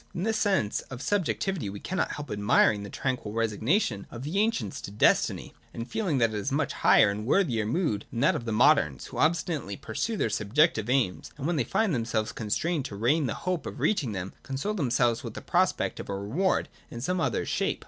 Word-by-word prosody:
In 175 - -2
this 220 +1 0
sense 190 - +1
of 130 - -7
sub 200 +4 0
jectivity 185 - -2
we 100 - -7
cannot 185 - -2
help 145 0 -7
admiring 105 0 +3
the 100 - -7
tranquil 125 -5 -3
resignation 115 - 0
of 120 +1 -8
the 160 +8 -1
ancients 205 - 0
to - - -7
destiny, 105 - +2 0.2
and 115 0 -5
feeling 170 - -1
that 115 -3 +3
it - - -2
is 105 +6 -2
a 135 - -1
much 150 -2 0
higher 100 - +5
and 105 +1 -4
worthier 120 - +1
mood 115 - 0
than 120 - -4
that 140 - +4
of 120 - -4
the 115 - -2
moderns, 75 -9 +3
who - - -7
obstinately 155 - 0
pursue 215 - -3
their - - +1
subjective 115 - +2
aims, 125 -9 0
and 140 - -5
when 175 +2 +1
they 145 - +1
find 205 - +1
themselves 115 -3 -1
constrained 135 +8 -1
to 100 - -6
resign 135 +8 +2
the 115 - -2
hope 180 -3 -1
of - - -7
reaching 145 - +1
them, 95 -1 -5
console 140 +10 -3
themselves 120 - +1
with - - -7
the - - -4
prospect - - 0
of - - -7
a 100 - -2
reward 150 - 0 0.2
in 120 - -7
some 180 +8 -1
other - - 0
shape. - - -1
125 Hz, 220 wpm, -28 LUFS, 110-170 Hz, 0.2 s, higher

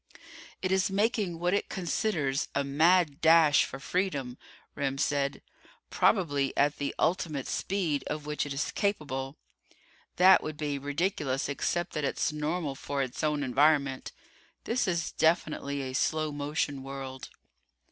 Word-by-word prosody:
"It 185 - 0
is 190 0 +2
making 205 -3 0
what 175 +2 0
it 200 - 0
considers 165 -6 -1
a 140 - +2
mad 155 +2 +3
dash 160 -2 +6
for - - -7
freedom," 140 -6 -2 0.4
Remm 135 -1 -2
said. 140 -1 0 0.5
"Probably 145 -9 +1
at 145 +1 +2
the 140 - -2
ultimate 160 -6 0
speed 175 -7 -1
of 150 0 -4
which 150 0 -2
it - - -7
is 140 +2 -2
capable. 145 -8 -2 0.8
That 185 +1 +7
would 155 -1 -6
be 145 -2 -2
ridiculous 145 -1 -1
except 175 +5 -2
that 150 - -2
it's 145 - 0
normal 150 0 -2
for 140 +1 -3
its 130 +4 -6
own 150 -1 +1
environment. 140 0 +2 0.5
This 230 -1 0
is 170 -2 -1
definitely 150 -4 0
a 130 -1 -5
slow 155 +3 0
motion 145 -1 -2
world." 135 -1 -7
150 Hz, 140 wpm, -29 LUFS, 140-175 Hz, 0.8 s, That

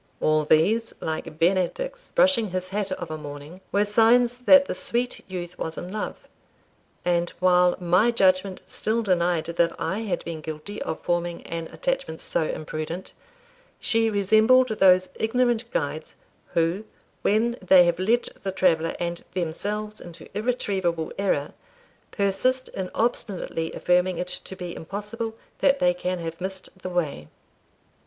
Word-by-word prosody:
All 155 0 +2
these, 210 +10 +3
like 155 -1 -4
Benedick's 195 - 0
brushing 250 -7 +4
his 185 0 -3
hat 200 0 -2
of 175 -3 -6
a 155 - -4
morning, 145 +4 -9
were 205 +1 +3
signs 235 +3 +4
that 280 +2 +7
the - - -3
sweet 240 +7 -2
youth 180 -1 -6
was 160 0 -4
in 180 - -6
love; 215 +1 -5 0.8
and 175 -1 +2
while 180 -1 +4
my 180 +6 +3
judgment 190 -4 +2
still 230 +2 -1
denied 175 -4 +1
that 170 0 +1
I 195 - -1
had 215 -5 -3
been 165 -2 -5
guilty 160 +7 -6
of 160 - -3
forming 175 0 -1
an 165 -1 -5
attachment - - -2
so 160 - -1
imprudent, 155 +4 -5 0.7
she 225 -1 +2
resembled 220 +5 +4
those 185 -4 +4
ignorant 240 0 +1
guides, 150 -3 -3 0.4
who, 170 +5 +1 0.4
when 235 +4 +1
they 185 -1 +7
have 175 0 +1
led 225 +6 +2
the 195 - -2
traveller 165 -3 +2
and 170 0 -3
themselves 210 +5 -3
into 170 -1 -11
irretrievable 195 -8 -1
error, 185 -8 0 0.6
persist 230 +6 0
in 185 -1 -5
obstinately 195 -8 -1
affirming 180 0 +2
it 180 +1 -3
to 190 - -2
be 180 -2 -6
impossible 210 +5 -5 0.2
that 275 -1 +4
they 270 -1 +3
can 185 -8 -2
have 165 0 -6
missed 190 0 -5
the 185 - -5
way. 155 - -2
185 Hz, 145 wpm, -25 LUFS, 170-220 Hz, 0.8 s, that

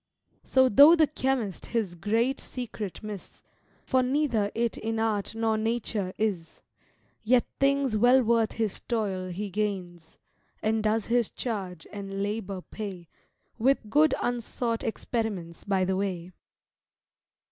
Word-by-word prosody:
So 260 0 +4
though 285 +8 +8
the 320 -2 +5
chymist 260 - -2
his 220 -7 -1
great 225 +9 0
secret 220 -5 -5
miss, 210 -3 -8 0.4
(For 260 - +3
neither 250 -6 +1
it 235 0 0
in 225 0 -3
art 220 -1 -1
nor 225 -1 +1
nature 220 -4 -1
is) 190 -7 -2 0.6
Yet 245 +2 +4
things 275 -3 +2
well 245 +4 +5
worth 230 -1 +2
his 220 -3 -2
toil 195 -6 -2
he 195 +3 -4
gains; 180 -5 -4 0.5
And 220 0 +1
does 215 0 +1
his 235 -2 +1
charge 190 -8 -5
and 195 -1 -4
labour 200 -2 -3
pay 190 -6 -7 0.5
With 240 -3 +2
good 305 +3 +5
unsought 240 -1 -2
experiments 220 -7 -3
by 190 -2 +1
the 190 +1 0
way." 185 -3 -3
220 Hz, 130 wpm, -27 LUFS, 195-240 Hz, 0.6 s, though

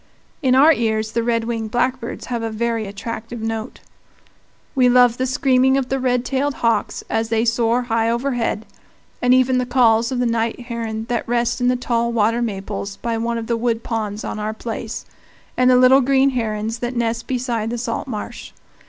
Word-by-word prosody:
In 260 -3 +3
our 300 +5 +7
ears 220 -3 -1
the 235 - 0
red 230 -1 0
winged 225 -1 -3
blackbirds 245 +1 -2
have 240 -2 -3
a 225 - -2
very 225 0 -2
attractive 230 +3 -6
note. 225 0 -4 0.9
We 255 -2 +4
love 245 -1 +5
the 260 - +1
screaming 260 0 +3
of 265 -2 -2
the 270 - 0
red 250 -1 0
tailed 270 +2 -1
hawks 230 -3 0
as 225 0 -1
they 225 +1 +1
soar 235 +1 +2
high 230 -1 0
overhead, 235 -3 -1 0.6
and 245 - +3
even 255 0 +4
the 250 - 0
calls 235 -2 +3
of 255 - -1
the 245 - +1
night 230 0 0
heron 230 -2 -4
that 240 -2 -1
nest 240 +1 0
in 245 - +2
the 250 - +3
tall 235 -1 0
water 230 +1 +1
maples 200 -2 -4
by 235 -1 -2
one 235 +1 -1
of 230 - -4
the 235 - 0
wood 230 0 -1
ponds 215 -2 -3
on 215 - -4
our 215 +1 -3
place, 225 0 -5 0.5
and 255 0 +4
the 250 - +6
little 255 +2 +6
green 270 +1 +3
herons 225 -2 -2
that 245 +1 -3
nest 235 0 -1
beside 240 -4 -2
the 240 - -3
salt 230 +1 -3
marsh. 235 0 -6
235 Hz, 195 wpm, -20 LUFS, 225-250 Hz, 0.9 s, our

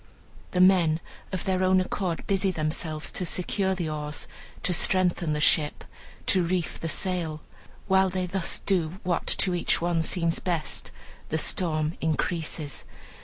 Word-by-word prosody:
The 180 - +1
men, 175 -4 +5 0.3
of 185 - -3
their 185 -1 0
own 185 0 +4
accord, 185 -2 -2
busy 195 0 +1
themselves 155 -2 -3
to - - -2
secure 190 +2 0
the 175 -3 -2
oars, 150 -1 -4 0.4
to 180 - +1
strengthen 175 -2 +2
the 150 - -1
ship, 150 -1 +2 0.4
to 185 - +4
reef 175 0 -1
the 165 - -3
sail. 165 -4 -1 0.5
While 190 -1 +4
they 185 0 -2
thus 180 0 0
do 180 -3 0
what 175 -2 -1
to 185 - +3
each 175 - +1
one 170 -1 +1
seems 165 0 +1
best, 170 -5 -2 0.4
the 160 - 0
storm 155 -1 0
increases. 160 -1 -2
175 Hz, 150 wpm, -27 LUFS, 160-185 Hz, 0.5 s, men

